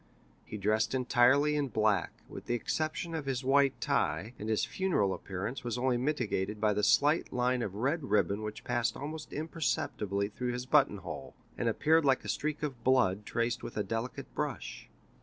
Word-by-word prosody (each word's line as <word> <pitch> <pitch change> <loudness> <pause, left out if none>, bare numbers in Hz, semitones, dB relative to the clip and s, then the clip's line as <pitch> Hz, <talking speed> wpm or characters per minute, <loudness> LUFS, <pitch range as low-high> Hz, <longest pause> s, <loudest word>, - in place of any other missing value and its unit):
He 105 - -6
dressed 110 +4 +1
entirely 130 +4 +4
in 145 -1 0
black, 105 -6 +1 0.2
with - - -10
the 120 - +1
exception 155 - -2
of 155 -4 -4
his 135 -1 -1
white 140 +1 +3
tie, 80 +11 0
and 105 - -4
his 110 0 +1
funeral 115 - 0
appearance 100 +9 -5
was 120 -1 -2
only 125 0 +1
mitigated 115 -7 -1
by 105 0 +3
the 105 - 0
slight 145 +9 +3
line 125 0 +1
of 100 -4 -3
red 140 +7 0
ribbon 105 -2 +1
which 105 0 -6
passed 120 -2 0
almost 155 +2 -6
imperceptibly 130 - -1
through 125 +3 -3
his 125 0 -4
button 135 -6 +4
hole, 95 -4 -8 0.2
and - - 0
appeared 160 +2 +3
like 135 -2 +2
a - - -5
streak 155 0 -2
of 130 -6 -4
blood 105 -6 +2
traced 115 +1 -1
with - - -7
a 105 - +1
delicate 115 +3 -4
brush. - - -4
125 Hz, 180 wpm, -31 LUFS, 105-140 Hz, 0.2 s, entirely